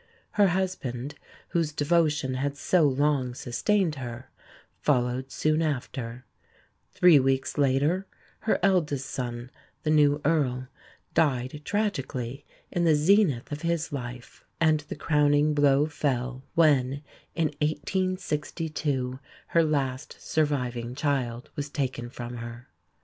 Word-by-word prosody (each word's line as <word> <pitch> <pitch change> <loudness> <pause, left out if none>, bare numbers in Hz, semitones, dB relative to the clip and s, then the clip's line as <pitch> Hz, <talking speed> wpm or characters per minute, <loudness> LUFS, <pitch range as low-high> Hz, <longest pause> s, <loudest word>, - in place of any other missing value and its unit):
Her 205 -1 +4
husband, 150 -8 -2 0.4
whose 165 -3 0
devotion 150 -3 +1
had 140 +2 -2
so 165 +1 +3
long 135 -2 +1
sustained 160 - 0
her, 120 +1 -7 0.5
followed 130 -1 +1
soon 155 +1 +1
after; 125 -5 -3 0.7
three 175 -5 +6
weeks 135 +1 0
later 145 +7 +2 0.3
her 220 - +1
eldest 160 -8 +2
son, 120 0 -4 0.3
the 155 - +1
new 145 -1 +4
Earl, 130 -5 +1 0.4
died 135 -1 +1
tragically 140 - -2 0.3
in 175 - 0
the 160 -2 +5
zenith 150 - +3
of 145 +1 -4
his 170 -1 -1
life; 125 -2 -7 0.2
and 155 -2 +4
the 150 - -7
crowning 150 -1 +3
blow 145 0 +4
fell 130 -3 -2
when, 140 -3 +3 0.3
in 165 -2 +1
1862, 150 -5 -1 0.3
her 170 - +4
last 135 -4 -1
surviving 125 -6 -1
child 130 -5 -1
was 145 0 -4
taken 130 -5 -3
from 120 0 -7
her. 120 +1 -8
145 Hz, 115 wpm, -27 LUFS, 130-155 Hz, 0.7 s, three